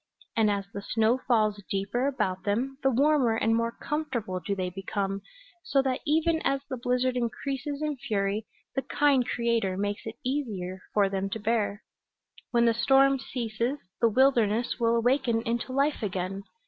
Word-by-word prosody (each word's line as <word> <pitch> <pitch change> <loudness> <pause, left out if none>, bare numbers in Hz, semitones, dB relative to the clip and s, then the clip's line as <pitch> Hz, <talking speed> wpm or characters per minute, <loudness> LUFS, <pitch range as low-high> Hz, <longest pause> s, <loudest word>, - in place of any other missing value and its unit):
And 220 -2 +4
as 200 -1 -1
the 200 - -4
snow 225 +4 +2
falls 215 -4 +2
deeper 200 +7 0
about 200 -9 -1
them 255 +7 -1
the 270 - +3
warmer 265 -2 +3
and 225 0 +2
more 230 0 +1
comfortable 235 -9 -3
do 190 +4 -2
they 185 -1 -2
become, 195 +1 -3 0.4
so 275 - +1
that 260 -1 0
even 320 +2 +2
as 275 0 +1
the 260 - -2
blizzard 250 +1 0
increases 270 +4 -3
in 300 -2 -1
fury 205 -2 -1 0.3
the 270 - 0
kind 270 -1 +2
Creator 230 -5 0
makes 205 +2 -2
it 220 - -6
easier 210 -10 -2
for 205 -2 +3
them 195 0 -2
to 220 - -4
bear. 210 -1 0 0.7
When 235 -1 +3
the 230 - +4
storm 270 +3 +4
ceases 240 +1 -2 0.2
the 230 - +4
wilderness 240 -2 +2
will 230 0 +3
awaken 235 -1 +2
into 235 +2 -2
life 280 +3 +1
again. 195 -1 -3
230 Hz, 165 wpm, -28 LUFS, 205-265 Hz, 0.7 s, And